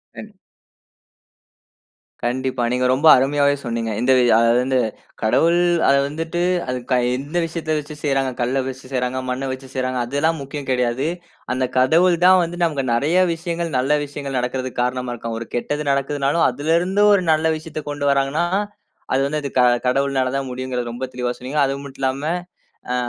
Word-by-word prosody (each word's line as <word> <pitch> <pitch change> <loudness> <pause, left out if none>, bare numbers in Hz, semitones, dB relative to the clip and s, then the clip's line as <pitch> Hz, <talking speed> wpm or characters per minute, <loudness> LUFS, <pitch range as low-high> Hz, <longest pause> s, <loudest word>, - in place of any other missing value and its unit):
கண்டி - - -11 1.9
கண்டிப்பா. 125 +1 -1
நீங்க 125 0 0
ரொம்ப 135 +5 +2
அருமையாவே 140 +2 +2
சொன்னீங்க. 115 -1 -2
இந்த 130 +2 +3
வி - - +4 0.2
அது 115 0 +4
வந்து 130 0 +1 0.4
கடவுள் 165 +10 +3 0.3
அது 140 - +5
வந்துட்டு, 165 +4 -3 0.3
அது 125 0 -2
க - - +5 0.2
எந்த 145 +5 -8
விஷயத்த 165 -1 -4
வச்சு 150 +1 -9
செய்றாங்க? 135 -3 +1
கல்ல 130 +3 0
வச்சு 130 0 -7
செய்றாங்க, 125 0 -1
மண்ண 130 +2 -2
வச்சு 130 +1 -7
செய்றாங்க, 130 -1 -2
அதெல்லாம் 145 +6 0
முக்கியம் 140 0 -7
கெடையாது. 125 +2 0 0.5
அந்த 130 0 0
கடவுள் 170 +7 +4
தான் 185 0 +7
வந்து 170 +1 -5
நமக்கு 150 -5 0
நெறைய 145 +9 +1 0.2
விஷயங்கள் 170 0 -3
நல்ல 135 +4 +1
விஷயங்கள் 140 -2 -5
நடக்குறதுக்கு 125 0 -3
காரணமா 125 0 -2
இருக்கான். 115 -1 -5
ஒரு 115 - -7
கெட்டது 145 +5 -2
நடக்குதுனாலும் 140 +3 +1
அதுல 145 +6 -1
இருந்து 190 +4 +1
ஒரு 195 -2 +3
நல்ல 155 +1 +2
விஷயத்த 155 -1 -7
கொண்டு 145 0 -3
வராங்கன்னா 140 +4 +1 0.7
அது 135 - +2
வந்து 150 +2 -2 0.5
கடவுள்னால 135 -1 +1
தான் 135 -1 -4
முடியும்ங்கறத 125 -1 -4
ரொம்ப 130 +2 -4
தெளிவா 125 -1 -2
சொன்னீங்க. 130 +4 -3
அதுமட்டுமில்லாம 135 0 -3 0.7
அ - - 0
135 Hz, 155 wpm, -21 LUFS, 125-150 Hz, 1.9 s, தான்